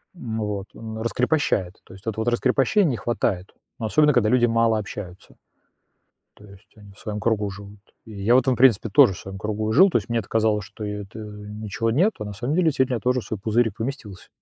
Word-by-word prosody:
М 115 -9 -5
вот. 105 -2 -3
Он 110 -1 -8
раскрепощает. 115 - 0
То - - -15
есть 95 +1 -15
вот 110 +1 -3
раскрепощений 135 - +2
не 120 - -2
хватает. 95 -5 -2 0.3
Ну, 115 - -3
особенно 150 +6 +3
когда 110 -4 +3
люди 120 0 +4
мало 115 -1 +2
общаются. 95 -3 -8 1.0
То 105 - -16
есть 100 +1 -17
они 105 -2 -15
в 100 - -20
своем 105 -1 -5
кругу 105 -2 0
живут. 100 +1 -11 0.3
И 110 - -12
я 120 +4 +4
в - - +8
этом, 130 0 +1
в - - -4
принципе, 120 -4 +4
тоже 95 0 +6
в - - -10
своем 95 0 -8
кругу 110 +2 -2
и - - 0
жил. 190 +9 +7
То 145 - +2
есть 110 - -5
мне 115 - +1
это 105 - -7
казалось, 110 -2 +1
что 105 +2 -10
это 105 0 -6
ничего 105 +1 -4
нет, 180 - +3
а 105 - -4
на 105 - -6
самом 125 +9 -2
деле 165 -3 +3
сильно 130 -1 0
я - - -2
тоже 125 0 0
в - - -12
свой 110 - -5
пузырик 110 0 0
поместился. 115 -6 -6
110 Hz, 230 wpm, -23 LUFS, 105-120 Hz, 1.0 s, в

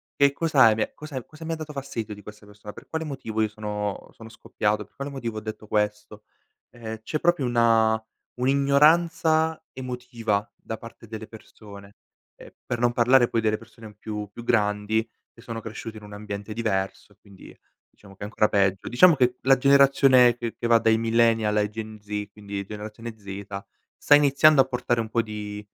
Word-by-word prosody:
"Che 140 0 +4
cosa 145 -3 +3
hai 110 -1 +5
me 110 - -2
cose 150 -2 -10
m 125 - -6
cosa 155 +1 -13
mi 165 +1 -3
ha - - -2
dato 155 -1 -8
fastidio 130 -6 -5
di 105 - -12
questa 105 +1 -13
persona, 105 0 -11
per - - -13
quale 160 0 -3
motivo 115 -7 -4
io 110 - +2
sono 105 -1 -5
sono 115 0 -13
scoppiato, 105 -1 -2
per - - -33
quale 140 +1 -5
motivo 120 -5 -5
ho - - -2
detto 110 0 -7
questo?" 105 0 -2 0.5
Ehm, 110 -2 -8
c'è 155 +7 -3
proprio 175 -6 +2
una 115 -2 +3 0.4
un'ignoranza 155 +4 +3
emotiva 125 -4 -3
da 110 - -7
parte 115 0 -13
delle 110 0 -7
persone, 100 -2 -14 0.4
ehm, - - -14
per 120 - -3
non 120 0 +2
parlare 120 +1 +4
poi 115 - -1
delle 110 -1 +1
persone 115 -1 -14
più 105 -1 -6
più 120 - -10
grandi 105 -1 +1 0.3
che 115 - -17
sono 115 -1 -6
cresciuti 110 0 -8
in 105 - -12
un 105 0 -11
ambiente 105 0 -6
diverso 100 -4 -3
e - - -34
quindi 100 -2 -16 0.3
diciamo 100 -1 -17
che - - -28
è - - -4
ancora 105 0 +1
peggio. 95 -1 +1
Diciamo 160 +8 +6
che 125 -1 +2
la 135 0 +4
generazione 135 -3 +5
che 115 -2 -5
che - - -5
va 115 0 +6
dai 110 0 +3
millennial 115 -2 +2
ai 105 0 +1
Gen 110 0 -8
Z 105 0 -5
quindi 100 -1 -6
generazione 110 +2 -8
zeta, 100 -1 -8 0.3
sta 145 - +5
iniziando 145 0 +5
a - - +2
portare 125 -2 -1
un 110 - -6
po' 115 +1 +1
di, 105 -1 -6
115 Hz, 195 wpm, -25 LUFS, 105-130 Hz, 0.5 s, Diciamo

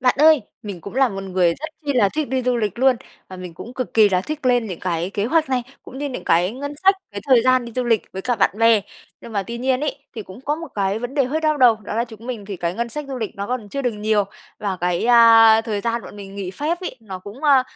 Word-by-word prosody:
bạn 250 -1 +3
ơi, 310 -2 +6 0.2
mình 200 -5 -7
cũng 200 - -9
là 265 0 +4
một 195 -3 -6
người 185 -2 +1
rất 315 +3 -6 0.2
chi 285 - 0
là 230 -6 +3
thích 305 -3 -2
đi 260 +1 -1
du 250 0 +1
lịch 210 -2 -2
luôn, 260 0 +4 0.3
và 185 - -9
mình 180 -2 -8
cũng 235 +9 -10
cực 255 -2 -4
kỳ 220 -2 +6
là 185 -2 +1
thích 300 +6 -5
lên 245 -2 +3
những 180 -5 -6
cái 175 0 -2
kế 200 0 -2
hoạch 315 +5 +2
này, 255 -2 0 0.2
cũng 265 - -10
như 290 +1 -2
những 255 - -6
cái 175 +3 +3
ngân 285 +3 -6
sách, 390 +1 +6 0.2
cái 200 -1 -6
thời 250 -3 +6
gian 255 0 +3
đi 235 - -9
du 250 +1 -2
lịch 230 -3 +2
với 190 - -5
cả 245 - 0
bạn 200 - +3
bè. 225 -1 +5 0.4
Nhưng 230 - -11
mà 200 -2 0
tuy 235 +5 -6
nhiên 255 +1 +1
ấy, 300 -1 -2 0.2
thì 220 - -5
cũng 190 +4 -12
có 290 +3 -1
một 330 0 -8
cái 200 0 0
vấn 245 +3 -6
đề 280 -3 +3
hơi 295 +5 -2
đau 310 -1 +1
đầu, 245 -5 +5
đó 210 -1 -7
là 230 +2 +1
chúng 230 -1 -13
mình 235 -5 -5
thì 195 -1 -6
cái 170 0 -2
ngân 235 +3 -2
sách 300 +6 -5
du 270 - -4
lịch 225 -2 -5
nó 200 0 -4
còn 245 -3 -4
chưa 275 +7 -4
được 245 -2 0
nhiều, 210 -1 +1 0.3
và 200 -3 -2
cái, 175 +1 0
a, 225 -2 +7
thời 220 -3 -3
gian 230 +2 -2
bọn - - -11
mình 195 -1 -10
nghỉ 195 -2 -5
phép 305 - -2
ấy, 360 -8 -5
nó 195 -4 -8
cũng, 205 +9 -11
ơ, 275 -3 +6
230 Hz, 295 wpm, -21 LUFS, 200-260 Hz, 0.4 s, a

